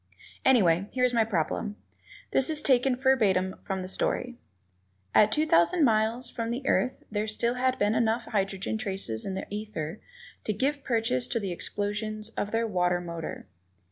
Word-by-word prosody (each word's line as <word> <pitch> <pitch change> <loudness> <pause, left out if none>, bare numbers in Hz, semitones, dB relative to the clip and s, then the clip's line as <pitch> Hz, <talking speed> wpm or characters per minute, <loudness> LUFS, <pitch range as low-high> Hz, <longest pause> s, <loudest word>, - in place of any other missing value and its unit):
Anyway, 195 -8 +4
here 255 - 0
is 250 -1 +3
my 230 -1 +4
problem; 205 +1 -2 0.6
this 265 - +3
is 310 -1 0
taken 260 -1 +3
verbatim 210 -8 +2
from 190 -1 -3
the - - -5
story: 245 +6 -1 0.8
"At 210 0 +5
two 305 +6 +2
thousand 310 - +4
miles 225 +2 +1
from 230 -1 -4
the 250 +3 -3
Earth 255 - +1
there 210 0 -1
had - - -4
still 235 +3 0 0.2
been 205 +1 +2
enough 230 +1 +1
hydrogen 195 +1 -1
traces 190 - -1
in 190 - -3
the 190 - -4
ether 205 -4 -5 0.5
to 215 - 0
give 280 +6 -1
purchase 225 - 0
to 230 - -1
the 195 -4 -3
explosions 210 +4 -3
of 205 -2 -3
their 225 +1 0
water 180 -4 +1
motor." 170 -2 -6
215 Hz, 170 wpm, -28 LUFS, 190-240 Hz, 0.8 s, At